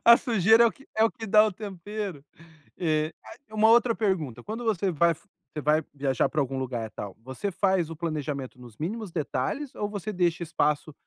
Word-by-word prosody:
A 235 0 +10
sujeira 225 -1 +5
é - - +7
o 230 - +1
que 275 - -19
é 220 - +5
o 225 - +3
que 225 -3 -8
dá 215 +1 +6
o 215 - -2
tempero. 200 -4 -6 0.5
E 155 -2 0
ah, - - -11
uma 215 0 +4
outra 235 0 +5
pergunta, 185 - -1
quando 225 +3 -5
você 200 -3 +1
vai 170 0 +3
você 155 -5 -11
vai 155 +2 +3
viajar 135 -3 +1
para 155 - -1
algum 135 -1 -1
lugar 125 -3 -3
e - - -22
tal, 100 -2 -7
você 130 - -4
faz 190 -3 +1
o 165 - -6
planejamento 150 -6 -4
nos 120 -3 -13
mínimos 200 - -4
detalhes 165 - -2
ou 205 - -2
você 210 +1 -4
deixa 175 -2 +1
espaço 155 -2 0
175 Hz, 205 wpm, -27 LUFS, 150-215 Hz, 0.5 s, A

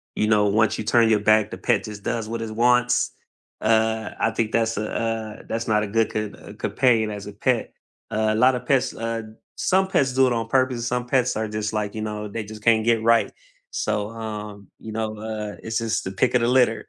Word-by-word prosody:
you 105 - +1
know, 105 -1 +4
once 110 +1 +2
you - - -3
turn 115 +1 +4
your 110 -1 +4
back, 110 0 +3
the - - -6
pet 110 -5 +1
just 105 -2 -8
does 110 0 -2
what 115 0 -3
it 115 -1 -4
wants? 125 +1 +3 0.5
Uh, 110 0 +1
I 115 - +2
think 110 -1 -1
that's 115 -2 +1
a, 105 0 -3
uh, 110 -2 -3
that's 115 0 -2
not 105 -1 +3
a - - -3
good 115 +2 +1
co 105 -1 -2 0.2
uh - - -9
companion 115 -4 +2
as 100 -1 -6
a 105 - -8
pet. 115 +3 -1 0.4
Uh, 110 0 +1
lotta 125 +2 +4
pets, 130 +1 0
uh 115 0 -3 0.3
some 190 0 +2
pets 135 -8 +1
do 130 0 +4
it 125 - +1
on 115 -1 -2
purpose; 130 -2 +1
some 125 0 -2
pets 125 -1 +1
are 110 +1 -1
just, 105 0 -3
like, 105 -1 -2
you 110 - -4
know, 105 0 -4
they 110 +2 -5
just 110 0 -10
can't 110 -1 +4
get 115 -1 +3
right. 115 0 +3 0.4
So, 105 +1 -1
um, 105 -3 -7
you 110 - -8
know, 110 0 -3
uh, 105 -1 -5
it's 110 +1 -1
just 115 -1 -1
the 95 - -4
pick 120 +6 +1
of 125 - +4
the 115 - +2
litter. 125 -2 +2
110 Hz, 225 wpm, -23 LUFS, 105-115 Hz, 0.5 s, know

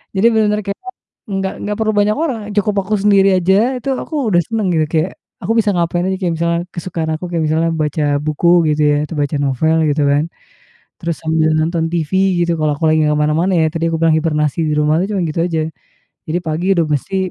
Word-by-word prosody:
Jadi 190 +3 +2
benar-benar 210 -1 +2
kayak 200 - -2 0.6
nggak 195 0 -2
nggak 210 0 -2
perlu 220 -1 +1
banyak 210 +1 +2
orang, 260 -8 -2 0.2
cukup 205 0 +1
aku 210 +3 -3
sendiri 195 -1 +4
aja, 185 +2 +2 0.2
itu 275 - -10
aku 315 - -6
udah 175 -3 +3
senang 225 -3 -2
gitu 160 - +2
kayak 165 +3 0 0.3
aku - - -2
bisa 210 -2 +2
ngapain 175 -1 0
aja, 190 - 0
kayak 180 -3 -1
misalkan 170 +1 0
kesukaan 170 -2 -4
aku 160 - -6
kayak 165 -2 0
misalkan, 165 +2 +1
baca 150 0 -1 0.2
buku 155 +3 -1 0.2
gitu 150 0 0
ya, 145 - +2
tuh 165 - -6
baca 145 0 -1
novel 145 +4 +1
gitu 145 0 +1
kan. 145 +2 +2 0.7
Terus 170 -1 -3
sambil 160 0 +1
nonton 160 +1 0
TV 160 -4 -2 0.3
gitu 170 -1 -1
kalau 155 -1 +1
aku 160 +2 0
lagi 155 - +3
nggak 150 - +2
kemana-mana 150 +5 +1
ya, 160 - +3
tadi 165 +1 -3
aku 160 - 0
bilang 165 -1 +4
hibernasi 150 -2 0
di 150 - 0
rumah 150 +1 +2
tuh - - -6
cuma 195 - 0
gitu 155 - -3
aja. 165 -3 -1 0.7
Jadi 160 +3 -1
pagi 160 +2 -3
udah 170 -2 +2
mesti 150 +6 -2
165 Hz, 215 wpm, -17 LUFS, 155-190 Hz, 0.7 s, sendiri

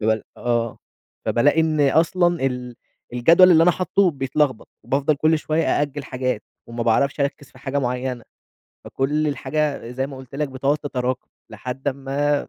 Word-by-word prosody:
باب 110 0 +1
آه، 120 -1 -1 0.5
فبالاقي 145 +6 +3
إن 160 -2 +1
أصلًا 175 -1 +2
ال 125 -2 -4 0.4
الجدول 165 +9 +6
اللي 165 -2 +6
أنا 180 - +6
حاطّه 185 +2 +2
بيتلخبط، 135 -3 -1 0.2
وبافضل 140 +3 +1
كُلّ 155 +2 +2
شوية 155 +1 0 0.2
أأجِّل 145 -1 -3
حاجات 130 -1 -2 0.2
وما 115 0 -4
باعرفش 135 +6 +1
أركِّز 140 0 -2
في - - -18
حاجة 140 +2 -2
معيّنة، 125 -1 -2 0.6
فكُلّ 150 +3 0
الحاجة 140 -3 -2
زي 130 +2 -2
ما 140 - -9
قلت 130 +1 -12
لَك 150 0 -1
بتقعد 135 +3 0
تتراكم، 130 -3 -3 0.2
لحد 130 +3 -5
أمّا 140 +2 -1
140 Hz, 155 wpm, -22 LUFS, 125-150 Hz, 0.6 s, الجدول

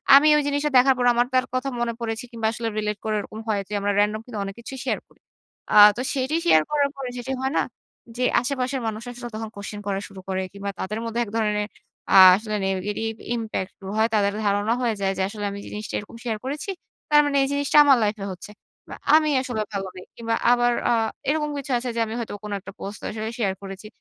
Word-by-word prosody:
আমি 295 +2 +7
ওই - - +3
জিনিসটা 285 +1 0
দেখার 265 +1 +6
পর 245 - +1
আমার 240 +1 +2
তার 255 0 +3
কথা 255 +2 -1
মনে 235 -1 0
পড়েছে 230 0 -3
কিংবা 225 -1 -1
আসলে 230 0 -4
রিলেট 210 -1 -1
করে 215 -1 0
এরকম 215 +1 -7
হয় 210 -2 +1
যে, 210 - -8
আমরা 205 +1 0
রেনডম 210 +1 +2
কিন্তু 225 -4 -6
অনেক 195 0 -6
কিছুই 260 +3 -8
শেয়ার - - 0
করি। - - -27 0.5
আ - - +5 0.2
তো 250 - -1
সেটি 270 +3 -1
শেয়ার 155 - +6
করার 285 -1 +2
পরে 265 -2 -4
যেটি 245 +2 -5
হয় 265 +1 0
না - - +4 0.6
যে, 250 - 0 0.2
আশেপাশের 260 0 -2
মানুষ 220 0 -3
আসলে 240 0 -7
তখন 220 0 -5
কোয়েশ্চেন 200 +1 -7
করা 195 -1 0
শুরু 195 -1 -12
করে 190 0 0
কিংবা 200 0 -5
তাদের 215 +4 -3
মধ্যে 230 +1 -2
এক 205 - -10
ধরনের 210 -1 0 0.5
আ - - +8 0.2
আসলে 215 0 -4
negative 210 +4 -2 0.2
impact 220 -4 -3
গুলো 195 0 -7
হয় 220 +1 +3
তাদের 200 -1 +2
ধারণা 205 +3 +2
হয়ে 230 -3 +1
যায় 195 0 +1
যে, - - -1
আসলে 205 -1 -5
আমি 200 - -6
জিনিসটা 210 0 -6
এরকম 210 +3 -11
শেয়ার 220 -3 -2
করেছি। 290 +7 -4 0.4
তার 295 0 +8
মানে 280 -1 +1
এই - - +1
জিনিসটা 285 +1 +1
আমার 275 -2 +7
লাইফ 210 0 +1
এ - - -3
হচ্ছে। 195 +3 -11 0.4
বা - - -6 0.2
আমি 310 -1 +4
আসলে 245 -4 -3
ভালো 195 -1 -2
নেই। 185 - -9
কিংবা 230 -1 -1 0.2
আবার 240 0 +3 0.2
আ - - +4 0.4
এরকম 300 0 +1
কিছু 275 -1 -5
আছে 245 +1 -3
যে, - - -1
আমি 220 - -6
হয়তো 230 - -5
কোনো 210 - -5
একটা 195 +1 -10
পোস্ট 200 +1 -6
আসলে 220 +1 -4
শেয়ার 195 -4 +1
করেছি। 195 +2 -8
225 Hz, 230 wpm, -24 LUFS, 205-255 Hz, 0.6 s, আ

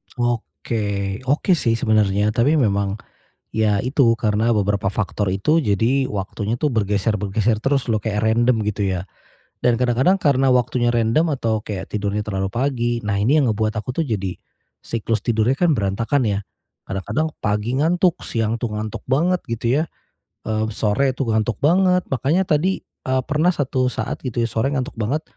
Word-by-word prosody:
Oke, 100 - -2
oke 145 +8 +1
sih 115 -6 +1
sebenarnya. 105 -3 +2
Tapi 130 +8 +2
memang 100 -7 +1 0.6
ya 105 -2 +2
itu 125 +1 +3
karena 110 +1 +1
beberapa 100 -2 +1
faktor 100 -1 -1
itu 100 +12 +2
jadi 115 +5 +2
waktunya 105 +3 -3
tuh 150 - +2
bergeser-bergeser 105 -1 0
terus 135 -2 +1
loh 110 -2 0
kayak 105 -2 -1
random, 120 +1 +3
gitu 105 -1 -1 0.2
ya. 95 - -9 0.5
Dan 125 - +2
kadang-kadang 130 +11 +2
karena 135 -2 +3
waktunya 120 -1 +1
random 120 +8 +2
atau 110 -5 -1
kayak 100 -3 -5
tidurnya 105 0 -2
terlalu 95 -2 -3
pagi. 120 -2 0
Nah, 100 -2 -1
ini 130 +10 +3
yang 130 - +2
ngebuat 110 0 0
aku 110 +3 -5
tuh 165 - +1
jadi 95 -7 -3 0.5
siklus 115 -1 -2
tidurnya 120 +3 +2
kan 175 -1 +3
berantakan 115 +5 0
ya. 100 -1 0 0.5
Kadang-kadang 150 +11 -2
pagi 105 +3 -1
ngantuk, 175 +2 +2
siang 115 -1 -1
tuh 120 - -1
ngantuk 110 +1 -5
banget, 170 +7 +2
gitu 115 0 -3 0.2
ya. - - +1 0.7
Eee, 110 0 0
sore 115 +6 +1
tuh 130 -1 -3
ngantuk 110 -1 0
banget. 180 +5 +3
Makanya 140 +8 +1
tadi 175 +5 +1
e 130 - -8 0.2
pernah 155 +4 +2
satu 130 -4 0
saat, 115 +5 -3
gitu 125 -2 -2
ya, 115 - 0
sore 115 +6 0
ngantuk 135 0 -3
banget. 125 +8 -1
115 Hz, 165 wpm, -21 LUFS, 105-135 Hz, 0.7 s, itu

